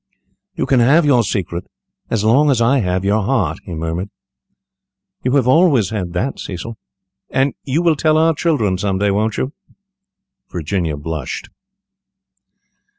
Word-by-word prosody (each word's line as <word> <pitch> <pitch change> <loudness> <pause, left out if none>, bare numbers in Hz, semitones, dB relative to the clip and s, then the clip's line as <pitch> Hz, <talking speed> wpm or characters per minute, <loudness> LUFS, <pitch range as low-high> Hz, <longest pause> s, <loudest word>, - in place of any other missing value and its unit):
"You - - -1
can 130 - +3
have 145 +7 +4
your 135 -5 +4
secret 90 -4 -3 0.4
as 110 -3 0
long 135 +7 +4
as 130 -4 +2
I 125 +4 +3
have 95 -2 -1
your 105 +2 +2
heart," 100 - 0
he 85 - -6
murmured. 80 +4 -3 1.1
"You 125 - -1
have 130 -3 +3
always 130 - +4
had 90 -6 -3
that, 125 +10 -2
Cecil." 100 +5 -6 0.5
"And 135 +1 +1
you 145 +6 0
will 165 -2 +3
tell 155 +1 +2
our 160 +1 +4
children 135 - 0
some 95 -1 0
day, 100 +1 +1
won't 105 +2 0
you?" 130 +3 -2 1.0
Virginia 85 -2 -2
blushed. 75 -2 -5
110 Hz, 150 wpm, -18 LUFS, 90-135 Hz, 1.1 s, have